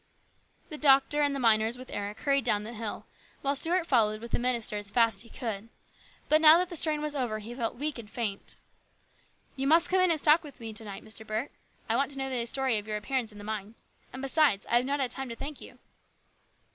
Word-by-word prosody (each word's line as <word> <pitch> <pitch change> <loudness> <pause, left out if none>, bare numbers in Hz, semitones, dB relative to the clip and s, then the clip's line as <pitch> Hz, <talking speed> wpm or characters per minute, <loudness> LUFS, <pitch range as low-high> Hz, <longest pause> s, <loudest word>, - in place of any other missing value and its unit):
The 305 -3 -7
doctor 280 +1 +4
and 285 -1 +1
the - - -2
miners 225 -1 +3
with 255 0 -11
Eric 205 +1 -5
hurried 275 -2 +2
down 210 -3 +1
the 225 +3 -7
hill, 220 -1 -5 0.4
while 280 +1 +1
Stuart 335 +4 +1
followed 215 -7 +2
with 235 +1 -9
the - - 0
minister 240 -3 0
as 205 -1 -4
fast 230 -1 +3
as - - +1
he 230 - -11
could. 225 -3 -5 0.6
But 310 +1 +4
now 315 +1 +9
that 360 0 0
the 350 - -7
strain 305 -1 0
was 300 -1 -3
over 245 -5 -1
he 215 +3 -8
felt 235 -2 -3
weak 290 +1 -4
and 215 -3 -10
faint. 215 -4 -4 0.5
" - - -36
You 270 0 -2
must 330 +4 +4
come 375 0 +4
in 370 - +4
and 330 - +3
stop 305 +2 +5
with 290 -4 -12
me 225 -2 -7
to 215 - -10
night, 200 -1 -9
Mr. 220 0 -3
Burke. 220 +5 -3 0.4
I - - +1
want 275 - +1
to 280 - -6
know 270 0 -2
the 240 -2 -1
story 260 -3 +1
of 205 - -11
your 215 -1 -2
appearance 235 +1 -2
in 210 - -14
the 205 - -10
mine. 215 0 -5 0.4
And, 260 +1 -8
besides, 270 -7 +2
I 240 - +6
have 245 - +1
not 285 +1 -1
had 260 -3 0
time 270 -2 -4
to 230 - -5
thank 285 +3 -7
you." - - -12
250 Hz, 245 wpm, -29 LUFS, 220-285 Hz, 0.6 s, now